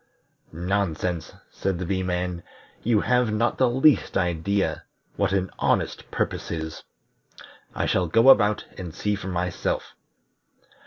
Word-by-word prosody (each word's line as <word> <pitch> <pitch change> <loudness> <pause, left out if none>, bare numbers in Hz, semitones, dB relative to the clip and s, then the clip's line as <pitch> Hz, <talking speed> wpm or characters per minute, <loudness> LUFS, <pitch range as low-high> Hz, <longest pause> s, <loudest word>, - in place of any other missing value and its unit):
"Nonsense," 90 -1 -2 0.2
said 95 -2 -2
the 90 - -4
Bee 95 +1 -1
man. 90 -1 -2 0.4
"You 110 -2 +2
have 125 -2 +2
not 115 +3 0
the 130 -2 +4
least 130 0 +3
idea 95 +2 0 0.3
what 100 -1 +1
an 95 -1 0
honest - - 0
purpose - - -2
is. 80 -1 -5 0.9
I - - 0
shall 90 -2 +1
go 115 +10 +5
about, 105 -5 +5
and 85 -4 -7
see 105 - -1
for 100 -2 -5
myself." 90 -1 -2
95 Hz, 135 wpm, -25 LUFS, 90-105 Hz, 0.9 s, go